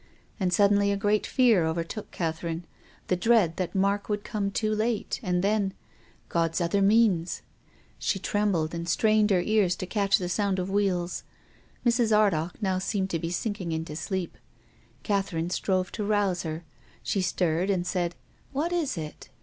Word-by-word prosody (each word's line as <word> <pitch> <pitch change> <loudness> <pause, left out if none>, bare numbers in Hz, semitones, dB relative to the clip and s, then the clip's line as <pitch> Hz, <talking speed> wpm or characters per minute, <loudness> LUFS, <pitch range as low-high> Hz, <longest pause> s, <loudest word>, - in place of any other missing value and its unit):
And 185 -2 +1
suddenly 200 +2 +4
a 200 - 0
great 205 +1 +1
fear 235 -9 +4
overtook 165 +6 -3
Catherine, 165 0 -3 0.4
the 180 - +2
dread 190 -4 +3
that 185 0 -3
Mark 200 +2 +1
would 205 -1 -1
come 200 -2 -2
too 215 +2 0
late, 215 0 -1
and 180 -3 0
then 200 -1 +1 0.3
— - - -32
God's 165 0 +1
other 175 +3 +1
means! 195 -4 +3 0.6
She - - 0
trembled, 190 -5 0
and 170 0 -4
strained 215 +3 +3
her 185 -3 +3
ears 210 -5 +2
to - - -5
catch 200 0 +2
the 180 - -3
sound 195 +1 0
of 185 +1 -2
wheels. 185 -3 0 0.6
Mrs. 235 -1 +3
Ardagh 175 -5 +1
now 190 -1 +1
seemed 195 0 -1
to 165 - 0
be 165 - -3
sinking 185 -1 -3
into 160 -1 -3
sleep 185 +1 -4 0.3
— - - -33
Catherine 190 -4 -1
strove 185 -1 0
to 210 - -3
rouse 200 -3 +1
her. 160 0 -5 0.4
She 195 - 0
stirred 180 0 0
and 180 -3 +1
said, 175 -1 -1 0.2
" - - -34
What 315 +6 -1
is 315 - -1
it 155 -2 -7
190 Hz, 175 wpm, -27 LUFS, 175-210 Hz, 0.6 s, suddenly